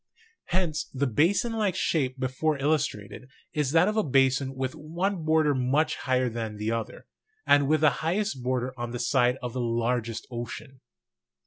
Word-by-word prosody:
Hence 170 -4 -1
the 135 +1 -2
basin 170 - +2
like 210 -5 0
shape 135 -8 0
before 135 +4 0
illustrated 135 -5 -2 0.2
is 150 -3 0
that 165 +3 +5
of 215 - 0
a - - +5
basin 135 0 +2
with 130 0 -2
one 170 +4 -3
border 155 -1 +3
much 135 +4 +1
higher 130 -1 0
than 115 -2 -4
the 105 +2 -2
other; 115 -1 -4 0.4
and 145 -1 +4
with 155 +1 +2
the 155 -2 +5
highest 180 - -1
border 125 0 -1
on 120 0 -4
the - - -2
side 125 0 +2
of 120 -1 -4
the 125 - -2
largest 115 -1 -1
ocean. 120 +2 -7
135 Hz, 170 wpm, -27 LUFS, 125-155 Hz, 0.4 s, that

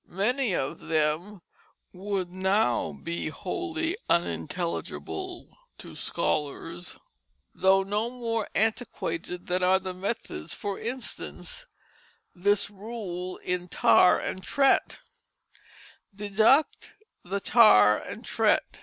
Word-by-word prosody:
Many 215 +3 0
of 135 - -2
them 165 +5 -1 0.5
would 190 -1 -3
now 185 - +1
be 170 - -4
wholly 330 - -3
unintelligible 175 - -2 0.2
to - - -10
scholars, 155 +4 -3 0.6
though 190 +1 +4
no 210 +4 -1
more 230 -3 -2
antiquated 180 -6 -2
than 180 +1 0
are 185 +1 +5
the 185 -1 -5
methods; 185 - -4
for 200 -1 -4
instance, 260 - -6 0.7
this 200 +3 +1
rule 195 -4 -6
in 180 0 -2
Tare 180 - +5
and 190 - -4
Trett: 275 +8 +2 1.2
"Deduct 215 +8 +2 0.3
the 195 +3 -2
Tare 105 - +6
and - - -8
Trett. - - +1
190 Hz, 100 wpm, -27 LUFS, 175-225 Hz, 1.2 s, Tare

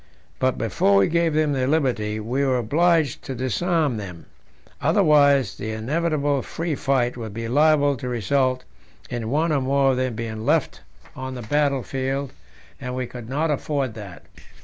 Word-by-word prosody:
But 130 0 +1
before 100 -2 +2
we 100 - +4
gave 170 -1 +1
them 155 -2 +2
their 130 -2 0
liberty 125 -8 0
we 120 +6 -1
were 130 -2 +2
obliged 155 +4 +2
to 135 - -5
disarm 145 - 0
them, 90 -5 -8 0.6
otherwise 140 -6 +4
the 110 - -5
inevitable 145 +4 0
free 165 +3 -4
fight 130 -3 0
would 110 -3 -7
be 115 0 -4
liable 145 +2 +3
to 125 0 -5
result 130 +2 0 0.5
in 115 -2 -3
one 155 +5 +1
or 145 -3 +1
more 135 +1 +2
of 130 - -1
them 130 -2 -1
being 110 -1 -5
left 150 +3 0 0.3
on 130 0 -6
the 125 - -6
battle 140 +2 +1
field, 135 +1 -3 0.5
and 125 -1 -5
we 130 0 -2
could 120 -1 -9
not 150 +4 0
afford 140 -3 -2
that. 100 -5 -10
130 Hz, 170 wpm, -23 LUFS, 120-145 Hz, 0.6 s, we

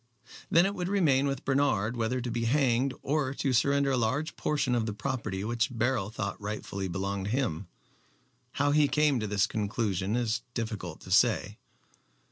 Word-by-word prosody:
Then 170 +2 +5
it 200 - 0
would 180 -2 -3
remain 150 -9 +3
with 135 0 -3
Bernard 130 -5 +1
whether 120 +2 -1
to 120 0 -4
be 115 0 -1
hanged 130 0 +2
or 140 -1 0
to 135 -2 0
surrender 140 +3 +3
a 130 - +2
large 130 +8 -1
portion 145 -4 0
of 115 -2 +1
the 105 - -2
property 105 -5 -3
which 120 +3 0
Beryl 120 -3 0
thought 105 -2 -4
rightfully 100 -2 -4
belonged 95 +2 -3
to 100 - -3
him. 105 - -1 0.9
How 145 +1 +1
he 150 0 +4
came 150 -3 +2
to 110 - -2
this 100 -1 +2
conclusion 105 -1 -1
it 125 - +1
is 115 0 -1
difficult 110 -8 -4
to 90 - -10
say. 110 0 +3
120 Hz, 180 wpm, -29 LUFS, 105-140 Hz, 0.9 s, Then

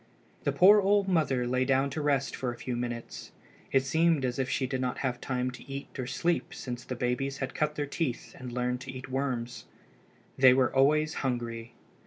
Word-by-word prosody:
The - - +3
poor 205 +3 +7
old 200 0 +3
mother 150 -9 +1
lay 130 +1 +1
down 135 +1 +2
to 155 - -3
rest 140 -2 +1
for 125 -2 -2
a 120 - -9
few 125 +1 -4
minutes. 120 -1 -5 0.4
It 135 -1 +3
seemed 160 0 +2
as 125 +1 -2
if 130 -1 0
she 130 - 0
did 130 0 -2
not 125 -1 -1
have 125 -1 -2
time 125 -1 -1
to 125 - -13
eat 140 0 -6
or 125 - -3
sleep 170 +6 -1
since 120 -1 -6
the 130 - -5
babies 125 +3 -1
had 135 -1 -4
cut 150 0 -1
their 145 - -1
teeth 145 -3 -3
and 125 -1 -7
learned 125 +1 -1
to 135 - -7
eat 130 0 -8
worms. 130 -3 -3 0.7
They 130 -1 +8
were 130 -2 +2
always 155 +3 +3
hungry. 120 -2 -3
130 Hz, 205 wpm, -29 LUFS, 125-140 Hz, 0.7 s, They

